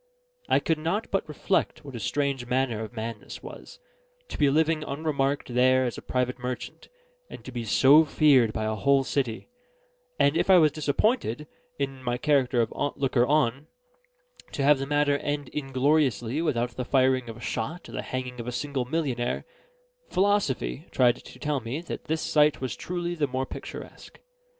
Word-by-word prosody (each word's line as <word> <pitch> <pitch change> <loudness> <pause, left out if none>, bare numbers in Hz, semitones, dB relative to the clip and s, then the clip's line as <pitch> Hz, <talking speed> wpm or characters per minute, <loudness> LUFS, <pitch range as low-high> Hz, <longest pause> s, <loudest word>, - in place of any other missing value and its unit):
I - - +4
could 160 -2 0
not 170 +8 -2
but 195 -5 -1
reflect 155 0 -1
what 140 - -9
a - - -5
strange 135 +1 -1
manner 125 -3 0
of 110 - -8
man 115 -1 -4
this - - -10
was, - - -10 0.5
to - - -6
be 145 -2 +4
living 155 +2 +2
unremarked 140 -3 -2
there 130 +1 +4
as 120 - -2
a - - -8
private 125 0 -2
merchant, 125 0 -6 0.4
and - - -11
to 130 - -7
be 120 -2 -4
so 140 +8 +6
feared 140 -6 +4
by 110 - -3
a 110 - 0
whole 135 +6 +3
city; 130 -4 -2 0.7
and 140 +2 +3
if 170 - +1
I 190 - +8
was 155 -3 +5
disappointed, 150 - 0 0.3
in 135 -2 -3
my 120 -1 -1
character 130 -3 +2
of 110 - -5 0.2
looker 130 -3 +2
on, 145 -1 +1 0.9
to 140 - -1
have 145 0 +5
the 135 - -3
matter 145 0 +2
end 145 -2 -3
ingloriously 135 -1 +1
without 125 -7 0
the 125 +2 -4
firing 130 -1 +2
of 115 - -8
a - - -12
shot 120 +9 -4
or - - -11
the - - -4
hanging 125 -1 -5
of 120 - -6
a - - -2
single 135 0 -2
millionnaire, 130 -4 -2 0.6
philosophy 180 - 0
tried 125 -1 +3
to - - -13
tell 150 -2 -1
me 120 +5 -4
that 170 - -7
this 160 0 -1
sight 150 -1 +3
was 130 -1 -3
truly 175 -1 -3
the 155 -4 0
more 130 0 -2
picturesque. - - -10
135 Hz, 180 wpm, -26 LUFS, 125-150 Hz, 0.9 s, I